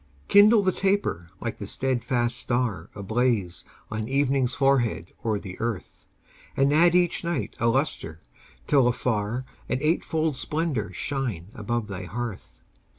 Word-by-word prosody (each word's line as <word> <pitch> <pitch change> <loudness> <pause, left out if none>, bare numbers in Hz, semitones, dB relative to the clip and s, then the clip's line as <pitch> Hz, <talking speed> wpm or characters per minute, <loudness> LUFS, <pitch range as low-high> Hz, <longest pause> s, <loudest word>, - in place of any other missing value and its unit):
Kindle 205 +1 +7
the 190 - +3
taper 190 - 0
like 115 - -4
the 100 - -5
steadfast 120 -1 0
star 120 -4 -1
Ablaze 105 -3 0 0.3
on 110 0 -3
evening's 135 -1 +1
forehead 125 - +1
o'er 110 -2 +1
the 95 -2 -8
earth, 115 -5 -4 0.5
And 140 +1 +4
add 170 +3 +5
each 175 -1 +2
night 170 -4 -2
a 115 - +2
lustre 115 - 0 0.5
till 135 -4 +4
afar 120 0 -1 0.2
An - - +1
eightfold 155 -1 0
splendor 150 -7 -2
shine 120 - -3
above 120 -1 -2
thy 95 -2 -6
hearth. 115 +2 -6
125 Hz, 135 wpm, -26 LUFS, 110-145 Hz, 0.5 s, Kindle